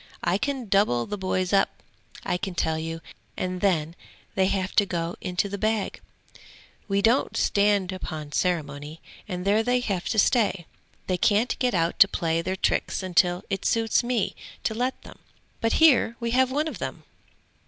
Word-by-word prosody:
I 180 +3 +1
can 265 -1 -2
double 195 - +2
the 205 - -4
boys 185 -1 -1
up, 195 - +4 0.5
I - - -1
can 185 0 -5
tell 160 -1 0
you, 165 +1 -5 0.4
and 185 0 -3
then 165 -5 +1 0.4
they 190 -1 +2
have 190 -1 -2
to 205 - +6
go 170 -2 -2
into 180 +2 -1
the 200 0 -5
bag; 215 -1 -1 0.9
we 200 -1 0
don't 235 +5 +2
stand 200 -2 +2
upon 155 -5 -6
ceremony, 150 -3 -2 0.3
and 180 -2 -5
there 205 +2 +3
they 245 +2 +1
have 195 -7 -2
to 220 - -1
stay; 205 -5 +2 0.4
they 185 - 0
can't 210 +6 +2
get 250 -5 +1
out 165 0 0
to 200 - +9
play 165 -4 -1
their 185 +2 -2
tricks 190 - 0
till 175 0 +3
it 195 - -2
suits 225 +1 +2
me 240 -4 -1 0.3
to - - 0
let 250 +4 -2
them. - - -13 0.4
But 225 - +1
here 275 -7 +5
we 235 0 -2
have 260 +1 +3
one 295 +4 0
of - - -6
them.' - - -5
195 Hz, 175 wpm, -25 LUFS, 175-225 Hz, 0.9 s, to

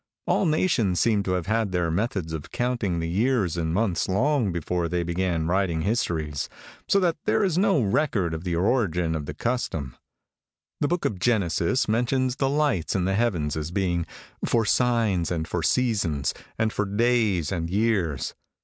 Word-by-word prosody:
"All 195 - +2
nations 135 - +2
seem 110 -3 +3
to 95 -2 -1
have 90 -2 -1
had 110 0 0
their 90 -2 0
methods 95 -3 -2
of 80 -2 -5
counting 120 -8 -1
the 80 0 -2
years 100 -1 +1
and 80 -2 -1
months 95 -1 0
long 120 +2 +2
before 85 0 -2
they 90 0 0
began 85 -1 -1
writing 85 -2 0
histories, 80 -9 -1 0.4
so 200 - +4
that 175 -3 +1
there 220 - +2
is 185 -5 +1
no 195 -3 +3
record 100 - +1
of 80 +1 -5
the 90 -2 -1
origin 90 -4 +1
of 75 -3 -4
the 75 - -5
custom. 80 - -2 0.8
The 145 - +1
Book 175 +2 -1
of 95 - -1
Genesis 100 +1 +1
mentions 125 +3 +1
the 135 -1 +1
lights 145 - 0
in 90 -2 +1
the 95 - +1
heavens 95 -9 0
as 80 0 -3
being 90 -2 -1 0.4
'for 115 -2 +2
signs 115 -9 +2
and 80 -2 -2
for 90 - -2
seasons, 95 - +1 0.2
and 110 -1 0
for 105 - 0
days 105 -6 +1
and 85 -3 -2
years.' 100 -7 0
95 Hz, 175 wpm, -25 LUFS, 85-120 Hz, 0.8 s, so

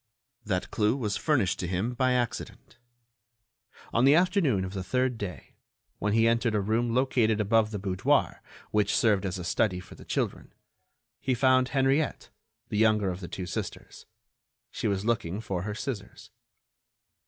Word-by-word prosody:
That 90 -4 -2
clue 105 +4 +1
was 105 -6 -2
furnished 125 - +1
to 90 - -2
him 95 +7 -1
by 130 0 +2
accident. 120 +1 -4 1.1
On 115 - +3
the 140 +3 +6
afternoon 170 - +2
of 95 - -7
the 95 -2 -4
third 125 +5 0
day, 100 -5 -7 0.4
when 105 0 0
he 115 +1 +4
entered 115 -1 +1
a - - +2
room 115 +4 0
located 120 -4 +2
above 110 +1 +3
the 105 - -4
boudoir, 95 -2 0 0.3
which 105 -1 +2
served 105 -3 +2
as 95 0 -3
a 90 - -6
study 90 +2 0
for 90 - -12
the - - -13
children, - - -3 0.7
he 130 - 0
found 130 0 +3
Henriette, 135 +2 0 0.4
the 105 - -1
younger 105 -3 +3
of 90 - -6
the 90 - -7
two 90 - -5
sisters. - - -6 0.6
She - - -2
was 100 -1 -1
looking 110 -5 -1
for 95 -5 -3
her 105 +2 -4
scissors. 110 -5 -6
110 Hz, 165 wpm, -28 LUFS, 100-125 Hz, 1.1 s, the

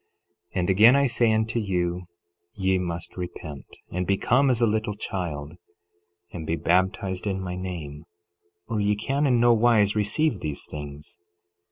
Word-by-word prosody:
11:37 - - +1
And 90 - -1
again 110 +7 +7
I 140 0 +4
say 120 -2 +2
unto 110 +1 +1
you, 90 -3 -1 0.5
ye 95 -1 +1
must 85 -1 -4
repent, 80 -5 -7 0.2
and 90 0 -2
become 125 +8 +3
as 125 -3 +2
a 120 - +4
little 110 -1 -1
child, 80 -7 -4 0.8
and 80 -3 -7
be 80 - +1
baptized 95 +3 0
in 95 -1 -1
my 90 -1 -4
name, 80 -5 -6 0.6
or 115 -2 -2
ye 105 0 +2
can 135 +7 0
in 125 -3 +3
nowise 115 -3 +4
receive 105 +4 +1
these 75 -4 -4
things. 75 +3 -8
95 Hz, 155 wpm, -25 LUFS, 85-110 Hz, 0.8 s, again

